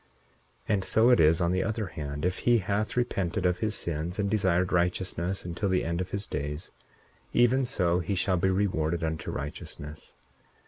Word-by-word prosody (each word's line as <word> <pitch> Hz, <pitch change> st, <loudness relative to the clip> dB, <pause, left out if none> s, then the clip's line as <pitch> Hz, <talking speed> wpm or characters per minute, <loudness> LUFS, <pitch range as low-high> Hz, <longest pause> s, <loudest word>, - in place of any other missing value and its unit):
41:6 110 Hz, -, +2 dB
And 95 Hz, -2 st, +1 dB
so 110 Hz, +5 st, +4 dB
it 120 Hz, -, +5 dB
is 80 Hz, +2 st, +5 dB
on 85 Hz, 0 st, +2 dB
the 95 Hz, +1 st, +1 dB
other 110 Hz, -1 st, -2 dB
hand. 75 Hz, -3 st, -5 dB
If 90 Hz, +1 st, 0 dB
he 120 Hz, -1 st, +4 dB
hath 105 Hz, +3 st, -1 dB
repented 95 Hz, -6 st, 0 dB
of 90 Hz, -1 st, +2 dB
his 110 Hz, -1 st, 0 dB
sins, 85 Hz, +2 st, -3 dB
and 100 Hz, -2 st, 0 dB
desired 95 Hz, -4 st, +2 dB
righteousness 90 Hz, +1 st, 0 dB
until 90 Hz, +3 st, -2 dB
the 95 Hz, 0 st, +2 dB
end 85 Hz, +1 st, -1 dB
of 90 Hz, -, -4 dB
his 100 Hz, +1 st, -3 dB
days, 75 Hz, +3 st, -5 dB, 0.6 s
even 125 Hz, +2 st, +4 dB
so 90 Hz, -8 st, +1 dB
he 95 Hz, +3 st, -2 dB
shall 95 Hz, 0 st, +1 dB
be 95 Hz, +2 st, +2 dB
rewarded 85 Hz, -4 st, 0 dB
unto 80 Hz, -1 st, -3 dB
righteousness. 75 Hz, +1 st, -6 dB
90 Hz, 185 wpm, -28 LUFS, 85-100 Hz, 0.6 s, it